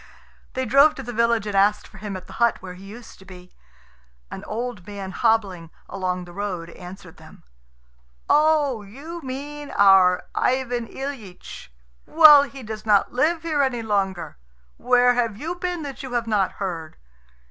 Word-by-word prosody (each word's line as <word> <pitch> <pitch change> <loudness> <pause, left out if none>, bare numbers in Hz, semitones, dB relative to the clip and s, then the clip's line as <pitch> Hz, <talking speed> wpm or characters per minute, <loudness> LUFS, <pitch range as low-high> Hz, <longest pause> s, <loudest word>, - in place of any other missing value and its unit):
They 260 0 -2
drove 280 +6 +5
to 270 - -7
the 245 0 -7
village, 230 -1 +1
and 205 - -4
asked 205 +2 +2
for 195 - -15
him 200 -2 -5
at 185 - -11
the - - -13
hut 235 -1 +3
where 185 -1 -9
he 185 +2 -13
used 225 +4 -12
to - - -15
be. 180 -1 -14 0.8
An - - -7
old 230 -4 -5
man 200 -2 -7
hobbling 200 -7 0 0.2
along 185 -2 -3
the 175 - -13
road 180 -4 -5
answered 180 +3 -12
them, - - -16 0.8
"Oh, 300 -6 +3
you 285 +12 -9
mean 290 +2 -7
our 190 -2 +5
Ivan 245 -2 -1
Ilyitch. 220 - -8 0.4
Well, 310 -3 +8
he 275 -2 -7
does 215 -1 -7
not 210 -3 +2
live 315 +7 +1
here 310 -3 0
any 250 -4 -1
longer. 195 - -2 0.4
Where 245 0 +3
have 230 -4 -1
you 320 +8 -4
been 355 -2 -4
that 275 -3 -7
you 260 -2 -8
have 240 -1 0
not 210 -4 0
heard? 170 -5 -6
225 Hz, 170 wpm, -23 LUFS, 195-270 Hz, 0.8 s, Well